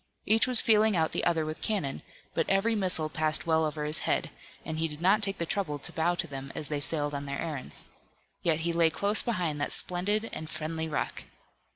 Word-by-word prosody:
Each 220 +4 +4
was 250 -2 +5
feeling 215 -1 +4
out 160 -2 +2
the - - -1
other 165 -2 +2
with 155 0 -5
cannon, 190 -11 -1 0.3
but 165 - 0
every 195 +4 +3
missile 185 -7 0
passed 155 +1 +1
well 160 -1 +3
over 150 -1 -3
his 150 +1 +2
head, - - 0 0.3
and 160 0 -3
he 165 - +2
did 150 -1 -8
not 195 +5 +4
take 195 -1 -1
the 170 - -1
trouble 165 -5 -1
to 140 - -5
bow 170 +2 +1
to - - -1
them 135 -1 -7
as 150 - 0
they 150 -1 -1
sailed 145 0 0
on 140 0 -3
their 140 0 -3
errands. 155 -6 -5 0.6
Yet 165 -2 +1
he 170 +1 0
lay 165 -1 +4
close 200 +6 +1
behind 175 -10 -1
that - - -1
splendid 205 +5 0
and 155 - -6
friendly 160 +1 -2
rock. 150 - -3
160 Hz, 220 wpm, -29 LUFS, 155-195 Hz, 0.6 s, was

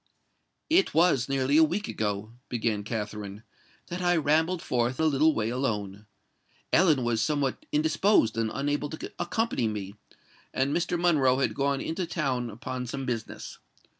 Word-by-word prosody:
"It 365 +4 +3
was 160 -7 +3
nearly 135 +1 +2
a 160 - +8
week 185 +7 0
ago," 105 0 -3 0.2
began 110 -3 -1
Katherine 105 -1 -5 0.4
"that 175 +1 -5
I 175 0 +3
rambled 160 +3 +1
forth 125 +1 0
a 160 - +2
little 155 +1 +3
way 110 0 0
alone. 105 -5 -3 0.7
Ellen 160 -7 +4
was 120 -2 +1
somewhat 140 +1 -1
indisposed 155 - +3
and 115 -1 0
unable 145 +1 -1
to 160 - -7
accompany 175 - 0
me; 100 -2 -4 0.6
and 135 +2 +1
Mr. 175 0 0
Monroe 145 -7 +3
had 135 - +1
gone 140 0 0
into 170 +2 -3
town 130 -8 -1
upon 125 +3 -5
some 135 +2 -4
business. 115 -3 -5
135 Hz, 150 wpm, -27 LUFS, 115-160 Hz, 0.7 s, a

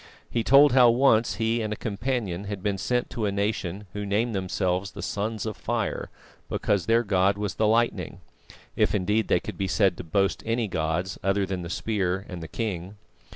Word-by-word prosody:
He 115 - 0
told 140 +4 +7
how 125 -1 +7
once 120 -2 +3
he 115 +1 0
and 110 -1 -3
a - - -1
companion 105 -4 -3
had 100 -2 -5
been 100 -2 -1
sent 125 +4 -1
to 110 -3 -1
a - - 0
nation, 100 -1 -2
who 105 - -4
named 105 +4 0
themselves 95 0 -1
the - - -7
Sons 110 +1 -2
of 110 -2 -3
Fire - - -2 0.4
because 100 -2 0
their 115 +1 +4
god 100 -1 +2
was 105 -2 -2
the 110 - +1
lightning, 115 +2 +1 0.6
if - - +2
indeed 105 +3 +1
they - - +3
could - - -8
be 95 - 0
said 95 -3 +2
to - - -6
boast 95 +4 0
any 115 0 0
gods 85 +1 -2
other 95 +1 +2
than 95 -1 -4
the 85 - -6
Spear 95 -1 -1
and 90 -3 -7
the 80 - -6
King. 95 -2 -4
105 Hz, 200 wpm, -26 LUFS, 95-115 Hz, 0.6 s, told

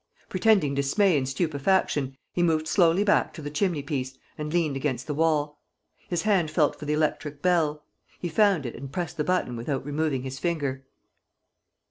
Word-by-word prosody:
Pretending 185 -7 +3
dismay 155 +7 +2
and 135 -2 0
stupefaction, 140 -2 0 0.2
he 175 - 0
moved 160 -2 +2
slowly 175 +2 +4
back 210 - +2
to 160 - -8
the 145 - -5
chimneypiece 145 -6 -2 0.2
and 150 0 -5
leant 160 -4 +1
against 135 -2 -2
the 150 - -3
wall. 150 -1 0 0.5
His 175 -2 -1
hand 195 -7 +2
felt 155 -1 +2
for 150 - -7
the 150 - 0
electric 150 -1 -1
bell. 160 -5 +2 0.4
He 175 - -3
found 190 -3 +3
it 120 - -4
and 135 +2 -8
pressed 175 +3 -4
the 150 - +1
button 180 -8 0
without 130 +3 -3
removing 145 -3 -1
his 130 0 -6
finger. 140 -6 -2
150 Hz, 170 wpm, -26 LUFS, 140-175 Hz, 0.5 s, slowly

